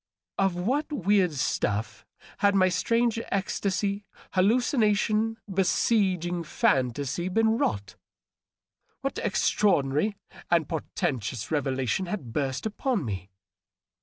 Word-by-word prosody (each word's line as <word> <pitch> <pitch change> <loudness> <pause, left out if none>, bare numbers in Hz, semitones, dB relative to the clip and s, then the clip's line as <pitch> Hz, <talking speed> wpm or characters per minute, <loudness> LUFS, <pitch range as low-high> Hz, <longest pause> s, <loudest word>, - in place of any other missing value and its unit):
Of 195 -2 +2
what 260 - -1
weird 195 - +2
stuff 105 -6 -2 0.3
had 200 0 +3
my 185 -1 +5
strange 230 +5 +1
ecstasy, 200 +1 -1 0.3
hallucination, 220 +1 +2
besieging 185 -2 +1
fantasy, 140 +3 0
been 225 +3 +3
wrought? 100 -2 -2 1.0
What - - -2
extraordinary 190 0 +1 0.3
and 170 -4 +3
portentous 130 -7 -3
revelation 135 - 0
had 145 - -5
burst 135 +1 -2
upon 220 - -1
me 95 -3 -5
185 Hz, 95 wpm, -27 LUFS, 140-210 Hz, 1.0 s, my